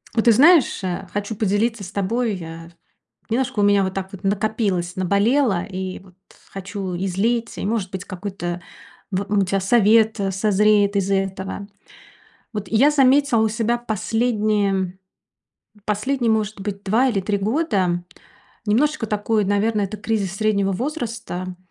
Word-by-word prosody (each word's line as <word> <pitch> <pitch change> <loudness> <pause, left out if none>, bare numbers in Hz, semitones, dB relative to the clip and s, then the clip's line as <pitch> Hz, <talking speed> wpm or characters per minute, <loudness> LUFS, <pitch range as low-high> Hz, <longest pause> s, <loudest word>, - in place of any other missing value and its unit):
Вот 225 - +1
ты 235 - +7
знаешь, 290 - +5
а, 185 +1 -3
хочу 205 +2 -3
поделиться 215 +2 0
с 185 - -8
тобой, 210 +1 -1
а. 165 0 -9 0.6
Немножко 250 -1 0
у - - +3
меня 205 -1 +4
вот 190 - -2
так 190 0 -4
вот 195 0 -10
накопилось, 200 -3 -1
наболело, 200 +3 +2
и 190 -1 -5
вот 185 -1 -19 0.4
хочу 195 -1 -5
излить, 200 +6 -1
и, - - -3
может 210 -3 -1
быть, 190 0 -6
какой-то, 180 -2 -5 0.5
вот, 195 +1 -2
ну, 205 0 +2
у - - +3
тя 195 +1 0
совет 220 +2 +4
созреет 205 +1 +3
из 195 -1 0
этого. 195 +1 -2 0.9
Вот 210 -1 -4
я 260 +7 +4
заметила 275 -3 +4
у 220 0 +3
себя 230 +2 0
последние 215 -4 0 0.9
последние, 235 +3 0
может 215 -2 -1
быть, 200 0 -5
2 225 +7 +2
или 215 -6 0
3 200 +2 -1
года, 195 - 0 0.6
немножечко 260 +4 +1
такой, 210 0 0
наверно, 205 +2 +1
это 200 +2 -3
кризис 205 -3 -2
среднего 200 -2 +1
возраста. 230 - -4
205 Hz, 145 wpm, -21 LUFS, 190-225 Hz, 0.9 s, ты